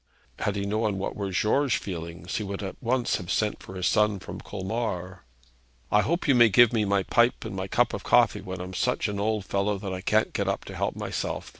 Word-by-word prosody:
Had 105 - -1
he 100 0 -2
known 105 0 0
what 95 - -3
were 100 -1 -3
George's 120 +8 +2
feelings, 85 -2 -5
he 110 - -2
would 100 0 -5
at 95 -2 -5
once 125 0 +1
have 90 - -8
sent 105 -1 0
for 95 - -10
his 90 -1 -2
son 105 -1 +3
from - - -8
Colmar. 95 -3 -4 0.7
'I 105 - +5
hope 170 - -1
you 140 - +6
may 120 -2 +6
give 120 +3 +6
me 110 -2 +2
my 100 -1 +2
pipe 120 +5 +2
and - - -5
my 95 0 -3
cup - - +2
of - - -4
coffee - - +4
when 95 0 -6
I'm 90 +1 -7
such 125 +6 0
an 100 -1 -3
old 105 -1 0
fellow 100 +1 0
that 95 -1 -5
I 95 - -4
can't 110 +3 +1
get - - -1
up - - -1
to - - -8
help - - -1
myself. - - -4
100 Hz, 235 wpm, -27 LUFS, 95-110 Hz, 0.7 s, you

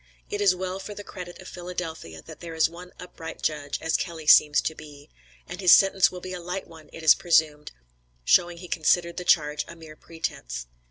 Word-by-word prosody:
It 205 - -2
is 195 -3 +4
well 185 +1 -4
for 205 +2 -8
the 205 - -8
credit 180 -3 -9
of 185 - -11
Philadelphia, 165 - -7
that - - -12
there 165 -2 -8
is 160 - +4
one 175 +2 -12
upright 170 -2 -9
judge, 145 -2 -2
as 165 0 0
Kelley 165 -4 -3
seems 150 0 +6
to 160 - -2
be, 150 -1 -13 0.4
and 180 +2 -7
his 180 - +5
sentence 195 -1 +5
will 180 - -8
be 185 0 -7
a 180 - -5
light 180 +2 -5
one 160 -2 -15
it 165 - -10
is 160 - +8
presumed, 155 -3 +1 0.5
showing 175 - +3
he 180 +1 -10
considered 170 +1 +1
the 180 - -3
charge 150 -3 +2
a 170 - -10
mere 160 -2 -13
pretence. 60 - -6
170 Hz, 210 wpm, -25 LUFS, 155-180 Hz, 0.5 s, is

